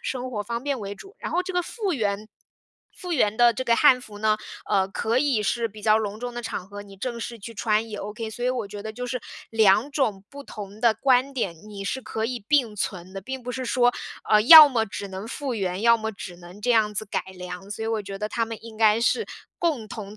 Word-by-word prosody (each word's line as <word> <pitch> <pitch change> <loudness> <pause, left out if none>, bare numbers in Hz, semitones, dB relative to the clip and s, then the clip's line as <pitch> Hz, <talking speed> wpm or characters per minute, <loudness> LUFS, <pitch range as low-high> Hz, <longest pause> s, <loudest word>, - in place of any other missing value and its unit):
生 255 -1 -4
活 215 -4 -3
方 235 +2 -4
便 280 -2 -1
为 200 -2 -5
主， 390 - -14
然 - - -5
后 360 - +2
这 375 +1 -5
个 360 -1 +1
复 405 0 -3
原 210 -5 -2 0.7
复 360 -2 -5
原 215 -7 +2
的 240 -1 +6
这 260 - -3
个 235 -2 +2
汉 260 -4 +6
服 210 -4 -11
呢， 215 0 +2 0.3
呃， 195 -2 +2
可 225 +4 0
以 260 -6 +2
是 230 +3 0
比 210 0 -13
较 215 0 +4
隆 210 -1 -4
重 245 +1 -5
的 240 - -5
场 205 -5 -5
合， 205 +1 -9
你 200 -1 -14
正 235 +3 -4
式 235 0 -6
去 225 +3 -8
穿 220 0 0
也 210 - -5
Ok。 215 +2 -5
所 240 - -8
以 250 - +2
我 245 -4 -2
觉 200 0 -8
得 220 - -5
就 250 +3 -6
是， 250 0 -3 0.3
两 220 +3 +4
种 220 -10 -1
不 280 0 -9
同 210 -4 -9
的 230 -2 +4
观 265 +2 +2
点， 200 -9 -1
你 200 -2 -7
是 265 - -2
可 220 -3 -4
以 245 0 -3
并 255 -8 +2
存 185 -2 -4
的， 195 - -6
并 265 +6 -6
不 250 +1 -5
是 255 0 -4
说， 245 0 +3 0.4
呃， 215 - +7
要 310 +5 +12
么 230 -5 0
只 195 +1 -6
能 190 +3 -7
复 275 +1 -4
原， 190 -2 -2
要 235 0 +6
么 220 0 -3
只 180 -4 -9
能 175 +2 -13
这 245 - +1
样 215 -3 +3
子 210 - -2
改 205 - -2 0.2
良， 180 +2 -8
所 220 +1 -4
以 - - -2
我 225 -2 -1
觉 195 0 -7
得 210 +1 -3
他 230 -1 0
们 225 0 -6
应 225 -1 -11
该 220 0 +5
是， 440 - +2 0.3
共 295 -11 0
同 205 0 -8
225 Hz, 275 characters per minute, -25 LUFS, 205-250 Hz, 0.7 s, 要